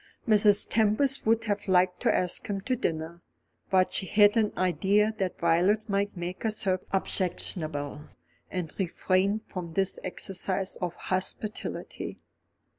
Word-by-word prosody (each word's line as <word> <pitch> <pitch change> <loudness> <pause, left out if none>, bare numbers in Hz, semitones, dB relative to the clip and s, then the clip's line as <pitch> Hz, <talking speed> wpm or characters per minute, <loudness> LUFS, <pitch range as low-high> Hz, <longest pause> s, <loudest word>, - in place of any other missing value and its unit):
Mrs. 210 -2 +4
Tempest 225 +5 +2
would 225 0 +3
have 205 -2 -2
liked 180 -1 +3
to - - +3
ask 180 -1 -1
him 200 -1 -2
to 255 +6 0
dinner; 165 -4 -3 0.5
but 185 -1 +3
she 190 - 0
had 205 +2 +5
an 220 -2 +2
idea 200 +4 +2
that 190 -2 -1
Violet 200 +7 +2
might 200 -1 -1
make 175 +2 -5
herself 200 -4 0
objectionable, 155 -6 -2 0.4
and 175 -4 -4
refrained 190 +3 +1
from 175 -4 -6
this 195 0 0
exercise 190 +1 -2
of 175 -2 -3
hospitality. 190 +3 -4
190 Hz, 130 wpm, -28 LUFS, 180-210 Hz, 0.5 s, had